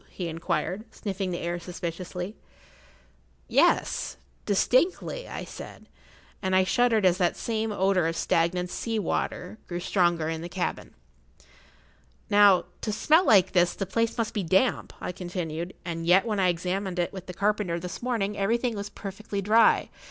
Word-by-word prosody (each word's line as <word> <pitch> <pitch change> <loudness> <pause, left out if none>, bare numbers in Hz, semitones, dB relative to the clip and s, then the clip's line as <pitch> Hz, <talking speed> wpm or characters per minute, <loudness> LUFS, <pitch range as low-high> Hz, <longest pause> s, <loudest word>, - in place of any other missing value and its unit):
he 180 - -5
inquired, 165 +4 -2
sniffing 195 -2 -4
the 175 - -2
air 175 0 -3
suspiciously. 180 +2 -5 1.1
"Yes—distinctly," 260 - +1
I - - -5
said, - - -10 0.6
and 190 -1 0
I 190 - +5
shuddered 225 +1 +2
as 180 0 +4
that 175 -2 +1
same 220 -1 -2
odour 190 -3 +2
of 165 - -2
stagnant 175 +2 0
sea 225 -1 -2
water 195 +1 -2
grew 175 -1 -4
stronger 175 -3 +1
in 160 0 -3
the 170 - -6
cabin. 180 0 -4 1.4
"Now, 205 -2 +6 0.2
to 215 - -2
smell 310 - +4
like 190 -3 +6
this, 175 -1 +3
the 195 - -2
place 230 +5 -1
must 230 -2 -1
be 210 - -1
damp," 190 +8 +1
I - - -4
continued, 175 -1 -5
"and 165 -1 -4
yet 185 +5 +5
when 215 -3 -1
I 185 - +3
examined 180 +2 -2
it 175 +2 -1
with 190 -1 -8
the 180 - -6
carpenter 200 -4 0
this 180 +1 -7
morning 225 -5 -1
everything 230 +4 0
was 200 0 -5
perfectly 200 +1 -6
dry. 215 +4 +4
190 Hz, 155 wpm, -27 LUFS, 175-210 Hz, 1.4 s, Now